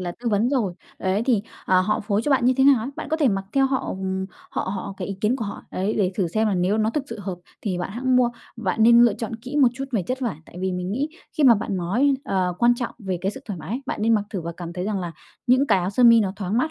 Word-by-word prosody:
là 175 -1 -3
tư 240 - -1
vấn 215 +2 +2
rồi. 235 -10 +1 0.3
Đấy, 190 +3 0
thì, 235 -6 +3 0.2
ờ, 185 0 +4
họ 210 +3 0
phối 205 0 0
cho 295 - -1
bạn 265 -3 +3
như 255 - +5
thế 265 - +4
nào 280 -1 +7
á, 240 +5 -4
bạn - - -6
có 315 - +1
thể 300 -4 +3
mặc 195 -2 -1
theo 270 -1 +4
họ 265 -1 -1
ừm, 190 0 -3 0.2
họ - - -2
họ 195 0 -5
cái 185 - -5
ý 200 - -3
kiến 220 +5 +2
của 230 - -3
họ. 200 - -6
Ấy, 195 +4 -1
để 190 -4 +1
thử 185 -3 0
xem 220 +5 +1
là 205 - +1
nếu 185 +4 +1
nó 220 0 +2
thực 275 +3 -2
sự 230 - -6
hợp 190 -3 -5 0.2
thì 185 -4 -2
bạn 180 - -3
hẵng 255 +3 +1
mua. 245 -1 +4 0.3
Bạn 220 -1 0
nên 235 +1 +7
lựa 235 -4 +5
chọn 225 +1 -5
kỹ 255 +5 -7
một 275 -4 +6
chút 270 +1 -4
về 215 -6 +1
chất 255 +9 -3
vải. 235 - -2
Tại - - -14
vì 190 0 -1
mình 180 +1 -3
nghĩ 275 +7 -1 0.3
khi 305 - +3
mà 245 -3 +8
bạn 200 -2 -2
nói, 230 +11 +2
ờ, 185 -2 0
quan 240 0 +5
trọng 240 -1 -4
về 190 -5 -3
cái 190 - 0
sự 265 - -9
thoải 200 -6 -5
mái, 225 - -4
bạn - - -3
nên 225 +1 +4
mặc 210 -2 +1
thử 195 - -3
và 170 0 -5
cảm 170 -1 -6
thấy 180 +1 -4
rằng 205 -1 -1
là 175 -2 -4 0.3
những 260 +3 +4
cái 195 - +4
áo 180 +1 -1
sơ 225 +5 +1
mi 230 -1 +8
nó 195 -3 0
thoáng 200 +2 -1
mát 315 +5 +1
215 Hz, 310 wpm, -23 LUFS, 190-245 Hz, 0.3 s, mà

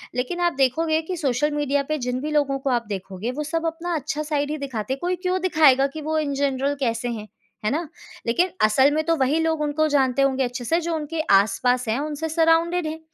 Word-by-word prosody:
लेकिन 255 +8 -2
आप 345 - -1
देखोगे 315 +5 +1
कि 355 +3 -5
सोशल 295 -1 0
मीडिया 285 -1 0
पे 310 - 0
जिन 250 0 -1
भी 305 +2 -3
लोगों 280 -2 +1
को 270 - -2
आप 240 -2 0
देखोगे 195 +3 -4
वो 295 +4 -4
सब 325 +2 -2
अपना 335 +2 -3
अच्छा 300 0 -3
साइड 295 -1 -1
ही 305 - -2
दिखाते 260 -4 -3
हैं, 270 - -6
कोई 360 +1 0
क्यों 365 +1 -1
दिखाएगा 300 -7 +4
कि 315 - -6
वो 315 +1 -1
इन 290 -2 -1
जनरल 275 0 0
कैसे 240 -2 -1
हैं, 215 -3 -5 0.4
है - - +3
ना? 320 +3 -2 0.4
लेकिन 345 +11 +2 0.2
असल 265 +6 +4
में 310 +1 0
तो 330 +1 +2
वही 270 +4 +2
लोग 320 -1 0
उनको 300 +1 +1
जानते 275 -2 +2
होंगे 270 -1 +2
अच्छे 245 0 -4
से 330 +7 +2
जो 335 0 -2
उनके 315 +1 -4
आस-पास 225 +5 +3
हैं, 220 +4 0
उनसे 305 +2 -3
साराउंडेड 330 +1 +2
हैं। 315 +1 -5
290 Hz, 230 wpm, -23 LUFS, 260-320 Hz, 0.4 s, दिखाएगा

